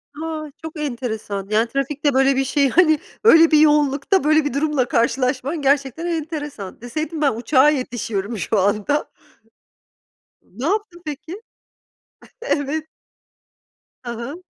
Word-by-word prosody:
A, 310 -1 -5
çok 320 -1 -8
enteresan, 220 -8 -4
yani, 220 +2 +2
trafikte 275 +3 -1
böyle 270 +1 +3
bir 270 - +1
şey, 275 0 +2
hani, 315 -3 +4 0.2
öyle 330 -7 +7
bir 305 - +6
yoğunlukta 295 +4 +3
böyle 310 0 +3
bir 290 - -2
durumla 280 -3 0
karşılaşman 260 +6 0
gerçekten 280 +3 +1
enteresan. 295 - -5
Deseydin 310 +6 -4
ben 280 - +3
uçağa 260 +4 +4
yetişiyorum 230 -6 -3
şu 210 +2 0
anda. 210 +9 0 1.3
Ne 240 +9 -8
yaptın 395 -2 -2
peki? 315 +7 -7 1.0
Evet. 310 - -2 1.2
Hı 240 - -5
hı. 250 +10 -7
285 Hz, 125 wpm, -21 LUFS, 245-310 Hz, 1.3 s, öyle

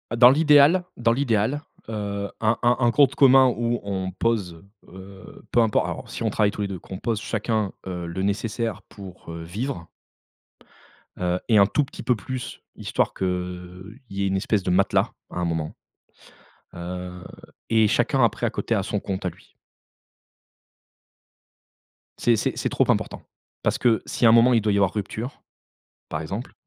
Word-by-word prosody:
Dans 120 +1 +8
l'idéal 150 +4 +5
dans 115 -1 +2
l'idéal, 125 +1 0 0.3
heu, 100 -2 -3
un 110 +1 +2
un 120 +1 +4
un 120 -1 +3
compte 140 +2 +4
commun 135 -1 +7
où 120 0 0
on 95 -2 -3
pose, 95 -5 -1 0.3
heu, 95 +1 -12
peu 120 - +4
importe 110 -2 +2
alors - - -6
si - - -7
on 110 - +1
travaille 105 0 +2
tous 105 - -6
les 100 - 0
2, 95 -3 -6
qu'on 95 - -8
pose 110 -1 -2
chacun, 110 -2 -1 0.2
heu, 90 -2 -4
le 85 +3 -4
nécessaire 110 +3 -2
pour, 95 -4 -11
heu, 85 - -7
vivre 95 0 -5 1.3
heu 90 0 0
et 110 - +5
un 100 - +7
tout 145 +8 +1
petit 135 - -9
peu 125 - +2
plus, 130 +4 -6
histoire - - -1
qu'il 95 - -2 0.8
y 100 0 -3
ait - - +1
une 95 0 0
espèce 100 0 0
de 90 - 0
matelas, 95 +2 +2 0.2
à - - -5
un 90 - 0
moment, 80 -2 -3 1.0
heu 90 0 -7 0.5
et 110 -1 +4
chacun, 120 +3 +2
après, 115 - +1
à - - +2
côté 115 - -2
a 100 - 0
son 105 0 -2
compte 95 -1 -4
à 90 - +1
lui. - - -19 2.6
C'est 120 -1 +3
c'est - - -1
c'est - - -1
trop - - +2
important. - - 0 0.4
Parce - - +1
que, 115 -3 +2
si - - 0
à 115 - +8
un - - +7
moment 120 +2 +6
il 115 - +4
doit 105 -1 +1
y - - +2
avoir 100 -3 +2
rupture, 110 +5 -5 0.7
par 75 - -3
exemple, 100 +10 -5
105 Hz, 180 wpm, -24 LUFS, 95-120 Hz, 2.6 s, Dans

